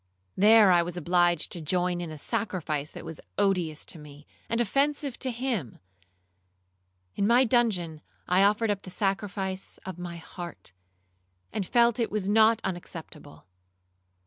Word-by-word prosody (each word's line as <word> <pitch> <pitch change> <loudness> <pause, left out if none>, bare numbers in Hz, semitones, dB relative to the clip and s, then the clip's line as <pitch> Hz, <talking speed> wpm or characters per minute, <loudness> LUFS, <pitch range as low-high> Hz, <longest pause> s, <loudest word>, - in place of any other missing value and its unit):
There 210 0 +7
I 175 -1 +5
was 175 +1 -4
obliged 175 -1 +2
to 175 - -4
join 175 +2 0
in 170 - -5
a 155 - -8
sacrifice 170 -7 -2
that - - -10
was 160 -1 -8 0.2
odious 180 -6 +1
to 165 - -5
me, 145 0 -13 0.2
and 230 - 0
offensive 280 +3 0
to 265 - 0
him;—in 235 - -2 1.6
my 240 +3 +5
dungeon 210 -11 +1 0.3
I 180 +2 +3
offered 210 +2 +3
up 200 -1 -2
the - - -10
sacrifice 195 0 -2
of 185 -2 -7
my 175 -1 -6
heart, 170 - -9 0.8
and 200 -4 -2
felt 235 -1 +3
it 230 - +1
was 210 -3 -2
not 220 +2 +4
unacceptable. 170 - -7
190 Hz, 145 wpm, -27 LUFS, 170-220 Hz, 1.6 s, There